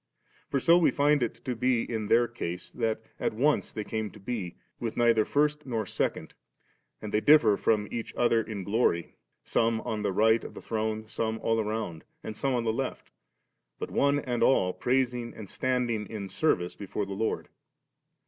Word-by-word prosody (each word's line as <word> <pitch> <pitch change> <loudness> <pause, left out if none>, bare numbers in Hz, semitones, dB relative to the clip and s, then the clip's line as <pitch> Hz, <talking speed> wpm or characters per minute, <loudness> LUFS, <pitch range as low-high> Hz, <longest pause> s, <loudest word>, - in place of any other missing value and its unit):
For 140 - +1
so 170 +6 +5
we 170 - +5
find 145 0 +3
it 120 - -3
to 125 - -1
be 125 0 +2
in 110 -3 -3
tiieir 120 0 +3
case, 90 -6 -5
that 110 -2 -1 0.2
at - - -1
once 145 +6 +2
they 105 - -4
came 110 0 -3
to 105 - -14
be, 100 -4 -4 0.2
with 115 -2 -4
neither 115 -2 +4
first 150 0 +1
nor 115 -4 -1
second, - - -2 0.7
and 105 - -5
they 105 - +3
differ 120 -8 +6
from 105 0 +1
each 115 -1 -4
other 120 -1 +3
in 105 -3 -5
glory, 100 -5 +1 0.3
some 115 0 +1
on 110 -3 -3
the 105 - 0
right 110 +3 +3
of - - -9
the - - -7
throne, 110 -1 -2
some 110 0 -2
all 115 0 +2
around, 105 -7 -3 0.2
and 110 - -6
some 135 +3 0
on 120 - 0
the 110 -1 0
left, 135 +2 -4 0.7
but - - -5
one 140 0 +3
and 125 -4 -2
all 90 -8 +4
praising 125 -2 0
and 105 -4 -9
standing 120 -5 -1
in 100 -2 -6
service 90 - +1
before 100 0 -4
the 100 - -6
Lord*. 110 +3 -2
115 Hz, 185 wpm, -28 LUFS, 105-125 Hz, 0.7 s, differ